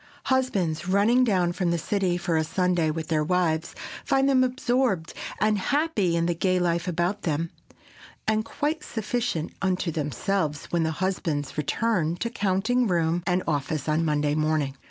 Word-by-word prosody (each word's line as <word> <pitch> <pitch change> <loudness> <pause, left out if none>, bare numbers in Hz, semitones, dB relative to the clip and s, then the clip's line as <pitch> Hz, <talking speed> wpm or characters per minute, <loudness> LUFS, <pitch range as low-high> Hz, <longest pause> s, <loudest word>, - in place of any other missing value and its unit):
Husbands, 185 -11 0
running 210 +7 +4
down 185 -7 +2
from 180 0 -1
the 170 - +1
city 185 +1 0
for 175 -1 -1
a 160 - +2
Sunday 175 -1 +1
with 155 0 -4
their 155 -2 +2
wives, 165 -1 0 0.3
find 270 -1 +2
them 260 -2 +4
absorbed 250 - 0 0.3
and 215 0 +2
happy 225 - +1
in 170 0 +1
the 175 - +1
gay 185 +2 +1
life 175 0 0
about 180 +4 -1
them, 165 +1 -1 0.8
and 220 0 +2
quite 295 +7 -2
sufficient 220 -6 -2
unto 185 -2 0
themselves 155 +1 -1
when 170 - +1
the 160 - +1
husbands 160 -5 -2
return 170 +2 0
to 230 +6 -3
counting 220 +4 +1
room 170 -2 +1
and 180 0 +1
office 150 -1 -1
on 155 +2 +2
Monday 150 -2 +1
morning. 155 -3 0
180 Hz, 160 wpm, -26 LUFS, 160-210 Hz, 0.8 s, running